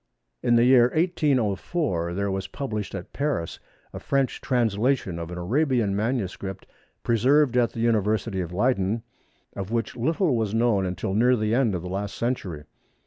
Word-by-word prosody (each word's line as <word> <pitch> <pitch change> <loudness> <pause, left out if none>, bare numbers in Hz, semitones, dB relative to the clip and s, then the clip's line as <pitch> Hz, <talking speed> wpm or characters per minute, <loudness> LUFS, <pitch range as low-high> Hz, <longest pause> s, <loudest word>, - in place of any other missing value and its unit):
In 120 - +3
the 115 - +5
year 125 -1 +6
1804 135 - 0
there 100 0 -1
was 95 0 -3
published 110 -8 -4
at 95 - -8
Paris 140 - -2 0.3
a - - -6
French 135 -2 -1
translation 115 -6 0
of 85 0 -6
an 90 - -6
Arabian 120 - +1
manuscript 100 -4 -3 0.4
preserved 130 +4 +3
at 120 -2 +2
the 115 - -4
University 110 -3 +1
of 85 -1 -5
Leyden 105 +1 0 0.5
of 95 -1 -5
which 115 0 -2
little 155 - +1
was 110 -2 -1
known 115 -5 +2
until 90 +1 -3
near 125 +5 +4
the 110 -1 0
end 120 -5 +2
of 85 - -4
the - - -5
last 100 +2 -4
century. 100 -11 -3
115 Hz, 160 wpm, -25 LUFS, 95-125 Hz, 0.5 s, year